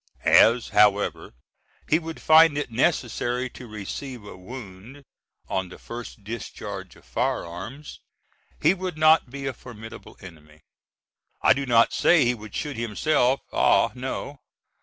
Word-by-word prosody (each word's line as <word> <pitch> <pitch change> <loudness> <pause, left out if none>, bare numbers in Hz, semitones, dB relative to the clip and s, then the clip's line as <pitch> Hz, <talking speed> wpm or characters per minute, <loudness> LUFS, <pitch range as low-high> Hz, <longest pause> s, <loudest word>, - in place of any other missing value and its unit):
As, 115 +1 +5
however, 105 -9 +2 0.5
he 160 - +3
would 165 -1 -8
find 160 -1 +6
it 145 -4 -3
necessary 125 -1 0
to 125 - -11
receive 110 +3 -7
a 100 - -10
wound, 110 +5 -11 0.4
on 95 -1 -2
the - - -11
first 115 -3 -9
discharge 115 +2 -7
of - - -20
firearms, 105 - -4 0.6
he 160 - +4
would 185 -4 -5
not 155 -3 +4
be 135 +2 -7
a 135 - -2
formidable 115 -3 -12
enemy. 75 -5 -14 0.8
I - - +6
do 140 0 -4
not 115 -1 +4
say 165 -7 +4
he 120 - +2
would 110 -3 -10
shoot 145 -4 -4
himself, 125 +4 +1
ah - - +3
no! 130 +2 -6
125 Hz, 140 wpm, -24 LUFS, 105-140 Hz, 0.8 s, find